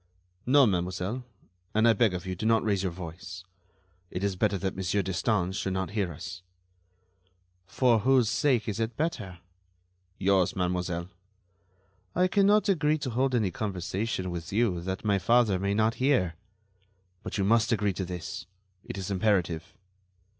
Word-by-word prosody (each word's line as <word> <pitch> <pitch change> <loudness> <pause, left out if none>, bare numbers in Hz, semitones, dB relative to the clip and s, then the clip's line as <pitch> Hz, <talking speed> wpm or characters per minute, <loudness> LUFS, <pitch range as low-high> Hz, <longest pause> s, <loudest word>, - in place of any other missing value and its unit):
"No, 140 +1 +6
mademoiselle; 95 +4 -1 0.5
and 110 +2 +4
I 115 - +6
beg 110 -6 +2
of 90 +1 -5
you, 95 0 -3
do 110 +5 -2
not 115 -1 +3
raise 100 -3 +1
your 95 -2 -1
voice. 90 +2 -8 0.7
It 90 - -4
is 100 -2 0
better 100 +1 +1
that 95 0 -3
Monsieur 95 +2 0
Destange 95 0 0
should 95 -1 -2
not 95 0 -2
hear 100 -5 -1
us." 90 +4 -8 1.3
"For 120 -1 +3
whose 130 0 +4
sake 120 0 +1
is 110 0 -3
it 115 0 -2
better?" 110 - -2 0.8
"Yours, 95 -2 +2
mademoiselle." 90 -1 -2 1.1
"I 180 +1 +4
cannot 205 +2 +4
agree 155 -5 +2
to 140 -4 -4
hold 130 +2 +1
any 105 -6 +1
conversation 95 0 -3
with 85 -1 -6
you 100 -5 +1
that 95 +4 -4
my 100 -2 +2
father 110 -1 +3
may 100 +1 0
not 110 +1 +2
hear." 125 - +2 0.9
"But - - -5
you 100 - +1
must 115 +3 +3
agree 105 -3 +1
to 95 - -3
this. 90 -1 -6 0.4
It - - -7
is 95 0 -4
imperative." 95 -3 0
100 Hz, 160 wpm, -28 LUFS, 90-115 Hz, 1.3 s, No